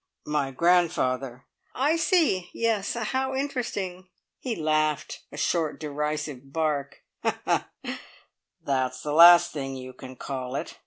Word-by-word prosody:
"My 150 -2 0
grandfather." 135 -5 +1 0.3
"I 290 +5 +2
see. 320 - +2
Yes. 225 -3 0
How 260 +4 -1
interesting." 205 -9 -3 0.3
He 245 -4 -3
laughed 155 -1 0
a - - -9
short, 165 -4 0
derisive 150 -3 -4
bark. 150 -3 -2 1.6
"That's 130 -2 -1
the 150 - -2
last 170 +2 +8
thing 135 -2 -4
you 130 0 -8
can 130 0 -10
call 130 0 -5
it! - - -5
155 Hz, 115 wpm, -26 LUFS, 135-190 Hz, 1.6 s, last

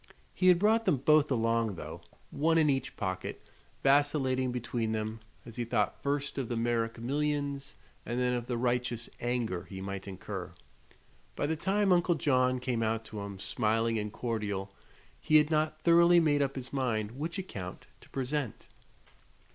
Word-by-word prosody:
He 185 - +1
had 180 -1 +7
brought 220 +4 +3
them 145 - +3
both 150 +3 +4
along, 115 -4 +1
though, - - -8 0.3
one 165 +3 +2
in 155 -3 +4
each 135 -1 -3
pocket, 95 -2 -3 0.4
vacillating 135 -2 +3
between 120 -2 -2
them 110 +1 -3 0.3
as 115 0 -10
he 120 - 0
thought 105 -3 0
first 140 0 -1
of 130 - -3
the 120 - -1
Merrick 115 -1 0
millions 140 +2 -2 0.3
and 120 +1 -3
then 125 0 +2
of 120 -1 -2
the 120 - -1
righteous 120 -1 -1
anger 120 -7 -1
he 95 0 -8
might 100 0 -5
incur. 95 -2 -6 0.8
By - - -1
the 160 +2 0
time 195 +4 +2
Uncle 175 -1 +3
John 130 -4 +2
came 125 -2 -1
out 110 0 0
to 110 - -7
him, 100 -1 -6
smiling 115 +3 0
and 105 0 -3
cordial, 105 -5 -3 0.5
he 155 - +1
had 150 0 +6
not 155 0 0
thoroughly 170 +1 +6
made 150 -3 +3
up 140 -1 0
his 130 0 -6
mind 115 -6 0
which 155 +8 -4
account 100 - -6 0.2
to - - -18
present. 135 -2 -3
125 Hz, 170 wpm, -31 LUFS, 115-150 Hz, 0.8 s, had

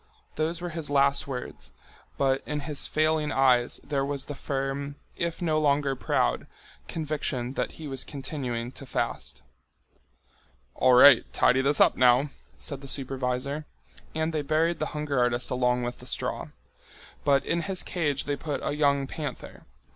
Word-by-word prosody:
Those 160 +2 -1
were 175 - -3
his 155 -2 -4
last 140 0 +3
words, 130 -2 -7 0.4
but 135 -1 +2
in 150 0 -2
his 145 -1 -1
failing 155 -1 +1
eyes 125 -2 +3
there 140 -2 -1
was 140 -1 -2
the 145 - -6
firm, 140 +1 -3 0.2
if 170 +1 -3
no 155 -2 +2
longer 140 -2 +2
proud, - - 0 0.4
conviction 150 -5 -2
that - - -2
he 160 - -8
was 135 -2 0
continuing 130 -4 -4
to 135 - -10
fast. - - -3 1.3
"All 130 -1 +4
right, 140 +3 +9
tidy 130 - +4
this 140 +2 +2
up - - +5
now," 130 +3 +4 0.3
said 140 -2 -6
the 140 - -9
supervisor. 135 +2 -2 0.5
And 160 +1 0
they 155 - 0
buried 160 +4 +1
the - - -1
hunger 145 -3 -1
artist 120 +1 +1
along 125 -1 +1
with 120 0 -4
the - - -12
straw. - - -3 0.8
But 140 -1 +3
in 170 - 0
his 185 +2 -2
cage 150 -6 -1
they 145 - -1
put 145 0 -4
a - - -1
young 140 -2 +2
panther. 145 -1 -7
140 Hz, 160 wpm, -27 LUFS, 130-150 Hz, 1.3 s, right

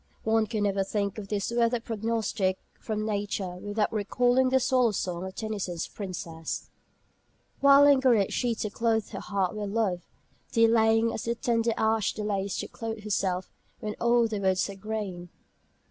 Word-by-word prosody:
One 220 0 +2
can 215 -2 -1
never 195 -1 +1
think 200 +1 -2
of 200 - -7
this 205 +1 -2
weather 235 0 +2
prognostic 220 -4 -1 0.2
from 215 -1 -3
nature 200 -3 -2
without 205 +3 -1
recalling 245 +5 +2
the 265 +1 +4
Swallow 250 -3 +2
Song 180 -2 -3
of 190 0 -7
Tennyson's 200 -6 -3
"Princess": 170 -5 -6 0.9
"Why 280 0 +7
lingereth 260 -8 +5
she 240 -2 0
to 215 -1 -3
clothe 225 -1 0
her - - -6
heart 195 -3 -1
with 205 -1 -3
love, 200 -5 0 0.5
Delaying, 225 0 +4
as 205 - -4
the 235 +1 0
tender 230 -1 +1
ash 220 -1 +1
delays 200 -2 -2
To - - -3
clothe 225 -3 -6
herself, 190 -3 -1 0.3
when 210 -1 -4
all 235 0 +4
the 215 -2 -3
woods 190 -1 +1
are - - -9
green?" 195 -4 -5
215 Hz, 160 wpm, -28 LUFS, 195-230 Hz, 0.9 s, Why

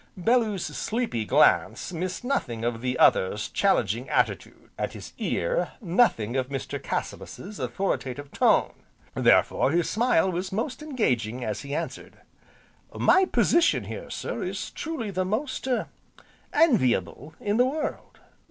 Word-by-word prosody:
Bellew's 215 -1 +1
sleepy 225 - -2
glance 180 - +3
missed 180 +5 -4
nothing 125 - -2
of 115 -1 -2
the 125 0 -1
other's 105 0 +3
challenging 120 - +1
attitude, - - -1
and - - -3
his - - -10
ear, - - -1
nothing 170 - +2
of 130 0 -1
Mr. 135 -2 -4
Cassilis's 200 +2 -5
authoritative 145 -7 -3
tone, - - +3 0.4
therefore - - +3
his 170 +3 +1
smile 215 -5 +2
was 185 +2 -3
most 235 +9 -3
engaging 125 - -1
as 105 -3 -3
he 140 +1 -5
answered: - - -5 0.8
"My 380 +1 +4
position 340 -2 +3
here, - - -7
sir, - - -4
is - - -4
truly 265 -10 -4
the 185 0 0
most 235 +8 -2
er 250 -2 0 0.6
enviable 155 - +2
in 205 +1 0
the 250 - +5
world. 300 +3 -4
185 Hz, 135 wpm, -26 LUFS, -, 0.8 s, the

